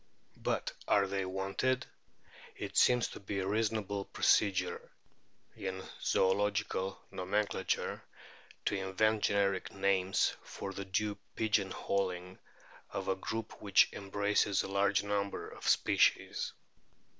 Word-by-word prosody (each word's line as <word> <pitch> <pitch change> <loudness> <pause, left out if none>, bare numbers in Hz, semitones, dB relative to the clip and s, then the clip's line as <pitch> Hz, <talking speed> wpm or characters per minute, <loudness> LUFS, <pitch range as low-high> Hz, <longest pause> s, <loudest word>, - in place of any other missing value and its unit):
But - - -1 0.2
are 100 - +4
they 95 0 -2
wanted? 95 +8 0 0.7
It - - -6
seems 125 -2 +5
to - - -9
be 100 0 -4
a 95 - -1
reason 110 +2 +1
able 100 -1 -3
procedure 100 -3 +2 0.7
in 95 -1 -4 0.2
zoological 95 0 +1
nomenclature 95 +1 -1 0.6
to - - +1
invent 100 +3 +1
generic 100 -2 +1
names 95 -1 +2
for 95 - -7
the 100 +1 -5
clue 100 +2 -1 0.2
pigeon 105 -3 +1
holing 90 -1 -2 0.5
of 95 -1 -4
a 95 - +2
group 110 +3 -5
which 100 -2 +4
embraces 100 0 +1
a - - -4
large 100 +1 +2
number 100 -1 -2
of - - -8
species. - - +3
100 Hz, 120 wpm, -33 LUFS, 95-105 Hz, 0.7 s, seems